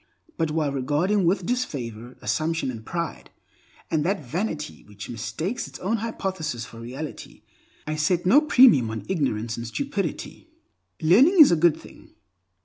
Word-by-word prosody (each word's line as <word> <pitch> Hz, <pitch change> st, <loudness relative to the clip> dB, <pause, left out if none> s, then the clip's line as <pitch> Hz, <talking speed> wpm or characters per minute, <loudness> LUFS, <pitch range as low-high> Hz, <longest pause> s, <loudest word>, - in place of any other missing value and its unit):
But 165 Hz, -2 st, 0 dB
while 150 Hz, -2 st, 0 dB
regarding 150 Hz, +9 st, +1 dB
with 185 Hz, 0 st, +1 dB
disfavor 125 Hz, -, -4 dB
assumption 160 Hz, -3 st, -1 dB
and 115 Hz, -3 st, -9 dB
pride, 170 Hz, +5 st, -5 dB, 0.6 s
and 155 Hz, -2 st, +1 dB
that 180 Hz, -3 st, -1 dB
vanity 155 Hz, -, -4 dB
which 105 Hz, +1 st, -9 dB
mistakes 120 Hz, -, -4 dB
its -, -, -10 dB
own 215 Hz, +5 st, -1 dB
hypothesis 190 Hz, -, -4 dB
for 115 Hz, -, -12 dB
reality, 130 Hz, +6 st, -8 dB, 0.4 s
I 155 Hz, 0 st, -3 dB
set 170 Hz, +4 st, +1 dB
no 245 Hz, +11 st, +6 dB
premium 245 Hz, -, +6 dB
on 110 Hz, 0 st, -5 dB
ignorance 120 Hz, -, -1 dB
and 115 Hz, 0 st, -5 dB
stupidity. 205 Hz, -, -4 dB, 0.5 s
Learning 255 Hz, -, +5 dB
is 305 Hz, -, +9 dB
a -, -, +5 dB
good 170 Hz, 0 st, +3 dB
thing. -, -, -16 dB
160 Hz, 145 wpm, -24 LUFS, 125-195 Hz, 0.6 s, is